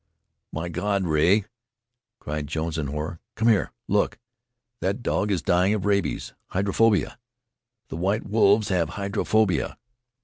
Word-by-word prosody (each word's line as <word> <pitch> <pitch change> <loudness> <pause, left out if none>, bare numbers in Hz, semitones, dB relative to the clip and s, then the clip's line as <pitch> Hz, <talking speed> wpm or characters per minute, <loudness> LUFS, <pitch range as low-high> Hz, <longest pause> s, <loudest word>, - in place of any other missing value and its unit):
"My 80 +2 -4
God! 100 +3 -1
Rea!" 85 +6 +3 0.7
cried 75 -4 -4
Jones 80 +1 -2
in 75 - -2
horror. 75 +3 -4 0.2
"Come 115 +1 +2
here! 110 -3 +2 0.2
Look! - - +1 0.6
That 100 +6 -2
dog 105 - 0
is 90 -6 0
dying 90 +4 +3
of 105 - -3
rabies! 100 -1 0
Hydrophobia! 100 +3 +1 0.7
The - - -5
white 100 +5 0
wolves 105 0 +3
have 85 -5 +1
hydrophobia!" 100 0 +1
95 Hz, 130 wpm, -25 LUFS, 80-105 Hz, 0.7 s, Rea